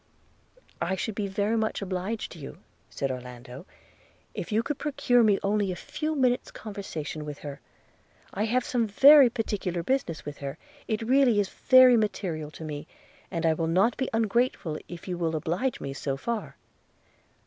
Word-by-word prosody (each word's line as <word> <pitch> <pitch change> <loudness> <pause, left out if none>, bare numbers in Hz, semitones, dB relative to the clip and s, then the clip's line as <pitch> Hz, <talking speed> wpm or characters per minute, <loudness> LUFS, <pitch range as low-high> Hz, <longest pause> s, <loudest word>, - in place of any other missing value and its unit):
'I 175 +3 0
should 220 +3 -3
be 205 0 -2
very 200 +3 0
much 220 -1 0
obliged 195 +3 -3
to 170 - -11
you,' 140 - -9 0.3
said 135 -1 -2
Orlando, 125 +4 -9 0.7
'if - - -6
you 220 +2 +2
could 290 +3 -3
procure 275 -4 +2
me 210 -3 +4
only 200 -1 +1
a - - -4
few 305 - -4
minutes 255 -3 +1
conversation 180 -8 -6
with 150 -1 -6
her. 140 -1 -7 0.7
I 205 +3 0
have 245 +2 +1
some 235 -3 0
very 275 +5 +8
particular 200 -7 -2
business 255 - -1
with 150 0 -7
her 140 +1 -5 0.2
– - - -25
it 220 -1 -1
really 250 -2 +4
is 200 -2 0
very 255 -2 +6
material 180 -8 -2
to 155 - -10
me, 150 -2 -6 0.4
and 165 -3 -2
I 160 - +4
will 160 +1 -1
not 190 +8 +3
be 260 - -2
ungrateful 225 -7 0
if 175 +1 -9
you 180 -1 -3
will 165 -2 0
oblige 175 - -1
me 135 - -5
so 135 0 -3
far.' 230 +9 -4
200 Hz, 175 wpm, -27 LUFS, 160-235 Hz, 0.7 s, very